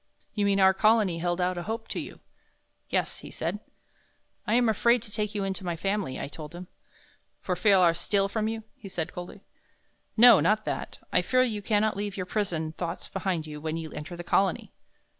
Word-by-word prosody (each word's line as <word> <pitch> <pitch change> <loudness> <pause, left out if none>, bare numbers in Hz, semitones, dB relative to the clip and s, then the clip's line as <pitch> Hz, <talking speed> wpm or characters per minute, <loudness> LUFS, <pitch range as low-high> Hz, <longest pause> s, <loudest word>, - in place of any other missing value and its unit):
"You 205 -2 0
mean 200 0 +2
our 190 0 +6
Colony 210 -3 +3
held 175 +1 -1
out 180 0 0
a - - -3
hope 225 +4 -4
to - - -3
you." - - -8 0.7
"Yes," - - -1
he - - -10
said. - - -3 0.9
"I 215 - +2
am 245 -1 +4
afraid 235 +2 +3
to 210 - -9
take 210 0 -2
you 200 - -1
into 190 0 -3
my 175 -2 -2
Family," 195 -5 -2
I - - -4
told 150 +2 -9
him. 180 +1 -7 0.7
"For 180 - -2
fear 195 +2 +4
I'll 175 -2 +5
steal 195 +3 +1
from 215 +2 -1
you?" 225 0 -3
he 200 - -10
said, 165 -4 -3
coldly. 180 +2 -8 0.8
"No, 235 -2 +9
not 215 +1 +2
that; - - -4 0.2
I - - +5
fear 255 0 +3
you 215 -5 -2
cannot 215 0 +1
leave 205 0 -4
your 185 - -2
prison 175 -6 -2
thoughts 170 +1 -5
behind 185 -4 -2
you 150 -1 -8
when 160 +1 -2
you 160 -2 -6
enter 150 +4 -7
the 175 - -6
Colony." 190 +3 +1
195 Hz, 205 wpm, -27 LUFS, 175-215 Hz, 0.9 s, No